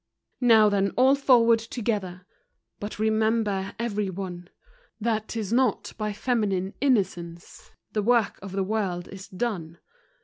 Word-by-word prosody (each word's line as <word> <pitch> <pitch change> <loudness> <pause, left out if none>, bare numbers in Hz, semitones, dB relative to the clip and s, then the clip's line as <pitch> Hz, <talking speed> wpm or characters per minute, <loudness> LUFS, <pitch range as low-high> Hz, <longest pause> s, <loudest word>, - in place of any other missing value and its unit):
Now 225 -4 +6
then, 200 -1 +2
all 260 +2 +6
forward 240 -5 +4
together! 205 -6 -4 0.5
But 205 +1 -6
remember, 220 -2 0
every 210 -4 -2
one, 180 -1 -6 0.5
That 220 -1 -1
'tis 220 -2 -3
not 250 -4 +1
by 215 -1 -3
feminine 200 -4 -1
innocence 180 -10 -1 0.2
The 215 - 0
work 230 0 +2
of 195 0 -8
the 195 0 0
world 190 -4 -2
is 195 0 -10
done. 180 -6 -4
210 Hz, 130 wpm, -26 LUFS, 190-230 Hz, 0.5 s, Now